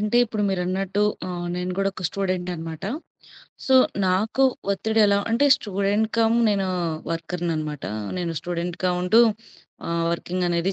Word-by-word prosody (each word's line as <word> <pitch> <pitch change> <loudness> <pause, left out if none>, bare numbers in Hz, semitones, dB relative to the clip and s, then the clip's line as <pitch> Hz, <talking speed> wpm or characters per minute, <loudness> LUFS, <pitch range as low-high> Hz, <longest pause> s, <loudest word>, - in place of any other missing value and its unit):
అంటే 210 +3 +1
ఇప్పుడు 215 -2 -3
మీరన్నట్టు 190 +2 -1 0.2
ఆహ్, 175 -1 -4
నేను 180 0 -2
కూడా 195 0 +2
ఒక 185 - -8
స్టూడెంట్ 185 -2 -2
అన్నమాట. 165 +1 -7 0.8
సో, 265 - +4 0.3
నాకు 215 +8 +2 0.3
ఒత్తిడి 220 +3 0
ఎలా 200 0 +3
అంటే 240 +6 +3
స్టూడెంట్ 200 +2 0
కమ్ 225 0 +4
నేను 200 -2 +1 0.4
వర్కర్‌ని 165 +1 -2
అనమాట. 150 -2 -4 0.3
నేను 170 -2 -2
స్టూడెంట్‌గా 175 +1 -2
ఉంటూ 220 +6 +5 0.7
ఆహ్, 170 0 0
వర్కింగ్ 180 +1 -2
అనేది 175 +2 0
185 Hz, 140 wpm, -24 LUFS, 175-205 Hz, 0.8 s, ఉంటూ